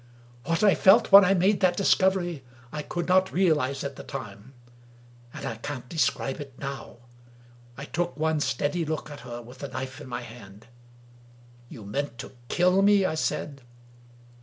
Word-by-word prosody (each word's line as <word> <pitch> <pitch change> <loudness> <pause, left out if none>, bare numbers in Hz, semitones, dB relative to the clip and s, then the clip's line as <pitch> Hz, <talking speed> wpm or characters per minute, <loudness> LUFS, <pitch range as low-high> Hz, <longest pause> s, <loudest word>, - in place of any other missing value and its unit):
What 165 +5 0
I 205 - +6
felt 215 +4 +5
when 200 +1 +10
I 195 +1 +3
made 190 +3 +2
that 180 -2 +2
discovery 185 -6 +1 0.3
I 150 - -4
could 175 +3 -4
not 185 +1 +3
realize 150 -7 +1
at 140 -1 -6
the - - -8
time, 105 +4 -9 0.8
and - - -8
I 115 - -4
can't 125 +1 -6
describe 150 -4 -1 0.2
now. 140 -3 -7 0.8
I 140 - -7
took 175 +2 -3
one 160 0 0
steady 145 +5 -1
look 155 -1 -4
at 145 - -9
her 120 -3 -8
with 125 +2 -14
the 140 - -5
knife 130 +1 -6
in 145 - -10
my 120 -1 -5
hand. 110 -3 -13 0.5
" 120 0 -26
You 110 - -11
meant 130 +4 -4
to - - -8 0.2
kill 180 +2 +3
me?" 200 -1 +4
I 185 - 0
said. 150 -2 -3
145 Hz, 170 wpm, -26 LUFS, 125-180 Hz, 0.8 s, when